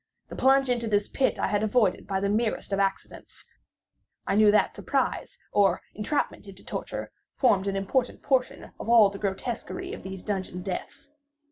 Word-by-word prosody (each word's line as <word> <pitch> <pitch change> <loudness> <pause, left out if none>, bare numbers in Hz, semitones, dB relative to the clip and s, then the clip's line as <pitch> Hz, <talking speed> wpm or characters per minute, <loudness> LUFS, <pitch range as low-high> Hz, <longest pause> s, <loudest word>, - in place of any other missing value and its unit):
The - - -7
plunge 270 0 +4
into 235 -2 -1
this 205 -1 +1
pit 270 - 0
I - - 0
had 205 +1 0
avoided 215 -2 +1
by 195 -1 -1
the 200 - 0
merest 215 -1 -1
of 195 - +1
accidents, 195 -1 -3 0.8
I - - 0
knew 210 +1 +6
that 210 - +3
surprise, - - -2
or 195 -3 +3
entrapment 215 -1 -2
into 195 -1 -12
torment, - - -5 0.2
formed 200 -7 +3
an 195 - -1
important 235 +6 -1
portion 260 -2 0
of - - -6
all 220 -4 +7
the 200 - -8
grotesquerie 240 - -4
of - - -7
these 190 -1 -8
dungeon 185 -3 -3
deaths. 275 +9 -6
210 Hz, 170 wpm, -27 LUFS, 195-245 Hz, 0.8 s, all